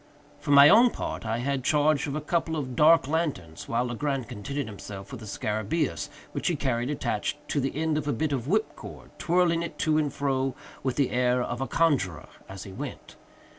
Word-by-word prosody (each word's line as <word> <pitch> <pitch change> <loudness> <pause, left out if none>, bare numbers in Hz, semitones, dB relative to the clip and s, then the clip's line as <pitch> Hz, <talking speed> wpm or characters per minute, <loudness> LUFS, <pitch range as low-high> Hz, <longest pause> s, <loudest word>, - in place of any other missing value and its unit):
For 150 - -8
my 140 0 +9
own 230 +8 +7
part, 115 - -5
I 115 +1 0
had 135 +2 -2
charge 150 +1 +2
of 140 - -3
a 155 - -2
couple 165 +1 -1
of 130 -5 -4
dark 155 0 +5
lanterns, 145 - -2
while 120 +2 +1
Legrand 130 +1 -2
contented 140 +7 -4
himself 100 -1 -9
with 130 - -7
the 110 - -10
scarabæus, 110 +10 -2 0.2
which - - -3
he 175 - +2
carried 125 -3 -1
attached 125 -3 -2
to 145 - 0
the 135 0 -2
end 155 0 0
of 145 - -6
a - - +2
bit 155 +1 -1
of 130 -3 -2
whip 215 +6 0
cord; - - -11
twirling 170 -1 +2
it 170 0 -5
to 155 -1 +2
and 150 -2 0
fro, 135 -2 -1 0.3
with 130 -2 -1
the 140 -3 +1
air 125 0 +2
of 125 - -4
a 135 - -1
conjuror, 120 - +1 0.2
as 95 0 -8
he 95 - -9
went. 95 - -8
140 Hz, 210 wpm, -27 LUFS, 120-155 Hz, 0.3 s, my